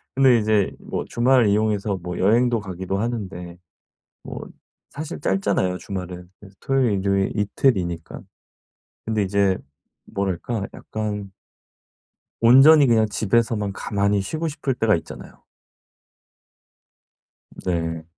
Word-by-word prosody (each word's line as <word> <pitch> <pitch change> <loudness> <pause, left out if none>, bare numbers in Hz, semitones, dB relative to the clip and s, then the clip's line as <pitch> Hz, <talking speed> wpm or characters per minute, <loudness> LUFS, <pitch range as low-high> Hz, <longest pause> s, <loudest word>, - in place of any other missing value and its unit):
근데 130 -3 +5
이제 105 -2 +1
뭐 - - -5
주말 125 -1 +3
이용해서 105 -1 +1
뭐 90 0 -5
여행도 115 +4 +3
가기도 95 -1 -4
하는데 95 -7 -4 0.7
뭐 - - -8 0.5
사실 150 0 -7
짧잖아요 95 -4 0
주말은. 90 -4 -7
그래서 95 -1 -16
토요일, 135 -5 +1
일요일 100 0 0
이틀이니까. 95 -6 0 0.9
근데 110 -2 0
이제 95 -1 +1 0.5
뭐랄까? 100 +2 -3
약간 105 -2 -5 1.1
온전히 135 +5 +7
그냥 110 -2 +3
집에서만 110 -1 0
가만히 100 0 0
쉬고 155 - -3
싶을 145 -3 -2
때가 110 -4 +3
있잖아요. - - -11 2.2
네. 80 -2 -2
105 Hz, 255 characters per minute, -22 LUFS, 95-115 Hz, 2.2 s, 온전히